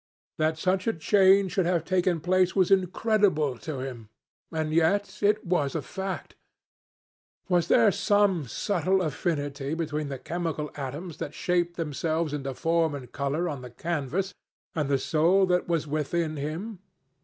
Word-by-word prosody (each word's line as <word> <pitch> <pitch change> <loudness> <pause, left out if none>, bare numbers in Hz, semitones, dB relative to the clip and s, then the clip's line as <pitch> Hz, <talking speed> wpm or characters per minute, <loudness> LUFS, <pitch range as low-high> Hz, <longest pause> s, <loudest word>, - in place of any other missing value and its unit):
That 155 0 +1
such 185 +4 0
a 225 - +3
change 190 +2 +4
should 190 -2 +1
have 170 -3 +1
taken 180 -2 +1
place 185 +2 +2
was 190 -1 +3
incredible 190 - +2
to 130 +4 -5
him. 120 -5 -7 0.4
And 155 -1 -2
yet 195 +5 +1
it 210 +1 +2
was 160 -6 0
a 160 - 0
fact. 190 +6 -5 1.2
Was 175 -2 +2
there 225 -1 +5
some 200 -5 +2
subtle 185 - 0
affinity 145 -2 -2
between 155 -3 -3
the 135 - -4
chemical 160 +1 -3
atoms 145 +5 -6
that 150 - -6
shaped 175 -1 0
themselves 160 0 -1
into 135 -2 -4
form 165 -1 +1
and 125 -3 -9
colour 145 +5 -1
on 145 -6 -4
the 125 - -8
canvas 170 +7 -2 0.4
and 150 -3 -1
the 140 - +3
soul 170 +8 +3
that 180 -1 +1
was 165 -3 0
within 155 +2 -1
him? 165 +9 -5
165 Hz, 155 wpm, -27 LUFS, 150-185 Hz, 1.2 s, there